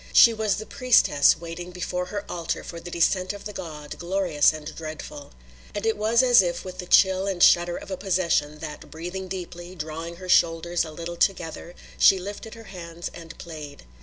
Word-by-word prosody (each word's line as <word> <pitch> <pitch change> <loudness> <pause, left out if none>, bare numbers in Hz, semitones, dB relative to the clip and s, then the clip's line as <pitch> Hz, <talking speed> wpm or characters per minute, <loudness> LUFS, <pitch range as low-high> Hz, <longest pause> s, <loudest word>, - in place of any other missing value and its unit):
She 230 - +8
was 215 -2 0
the 215 - -6
priestess 230 - +4
waiting 170 +1 -7
before 180 0 -3
her 205 +1 -5
altar 170 -2 -3
for 170 - -8
the 175 - -9
descent 185 +3 +1
of 205 - -10
the 210 - -6
god, 150 -5 -8
glorious 175 -4 +2
and 155 0 -8
dreadful. 155 -2 -8 0.4
And 205 - -3
it 225 - +2
was 225 +4 +3
as 245 -4 +7
if 175 -1 -3
with 185 -1 -8
the 180 - -6
chill 190 +1 +4
and 185 -3 +1
shudder 175 0 +5
of - - -10
a 190 - -3
possession 170 -5 0
that, 155 -1 -8
breathing 180 +4 -6
deeply, 180 -1 -7
drawing 165 +1 -6
her 185 +1 -10
shoulders 170 0 +3
a 160 - -7
little 170 +2 -7
together, 175 -2 -1 0.2
she 195 - +7
lifted 205 +4 -7
her 225 - -11
hands 170 -4 -8
and 165 0 -11
played. 155 -4 -9
175 Hz, 195 wpm, -25 LUFS, 165-190 Hz, 0.4 s, She